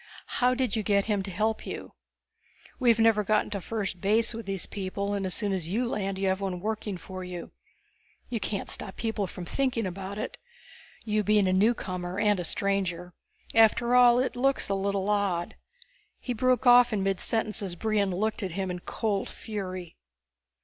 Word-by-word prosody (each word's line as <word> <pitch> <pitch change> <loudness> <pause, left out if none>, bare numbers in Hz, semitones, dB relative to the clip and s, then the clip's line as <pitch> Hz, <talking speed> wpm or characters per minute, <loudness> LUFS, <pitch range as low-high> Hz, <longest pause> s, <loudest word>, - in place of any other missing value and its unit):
How 250 +1 +4
did 255 -1 0
you 220 - +1
get 200 -1 +2
him 210 -3 0
to 195 - -5
help 215 +4 -1
you? - - -7 0.9
We've 240 -4 +4
never 225 -2 +4
gotten 215 +1 +1
to 200 -2 -3
first 195 -4 -3
base 220 +4 +3
with 225 -2 -7
these 195 -3 -2
people, 200 0 -3
and 195 -2 -1
as 185 - -3
soon 205 -3 -1
as 180 -4 -3
you 235 +6 0
land 195 -4 -2
you 195 0 0
have 190 +1 0
one 190 -2 -2
working 210 -1 -3
for 185 +1 -8
you. 180 -1 -7 0.8
You 235 - -2
can't 200 0 -3
stop 190 - -4
people 220 -3 -2
from 180 0 -8
thinking 255 -1 0
about 190 +2 -5
it, 215 - -4 0.7
you 215 -1 +1
being 210 -1 +3
a 185 - +2
newcomer 185 -3 0
and 205 -2 +3
a - - -2
stranger. 180 -1 -1 0.4
After 225 +2 +4
all, 245 -1 +7
it 255 0 0
looks 270 -1 +1
a - - +1
little 195 0 -1
odd 200 -5 0 0.3
" - - -37
He 250 - -3
broke 255 +2 +2
off 245 0 +7
in 205 -3 0
midsentence 210 +3 0
as 190 -3 -2
Brion 210 +1 +1
looked 210 +5 -1
at 190 -4 -3
him 190 0 -2
in 180 - -4
cold 205 +1 -2
fury. 185 -5 -6
200 Hz, 190 wpm, -28 LUFS, 190-225 Hz, 0.9 s, all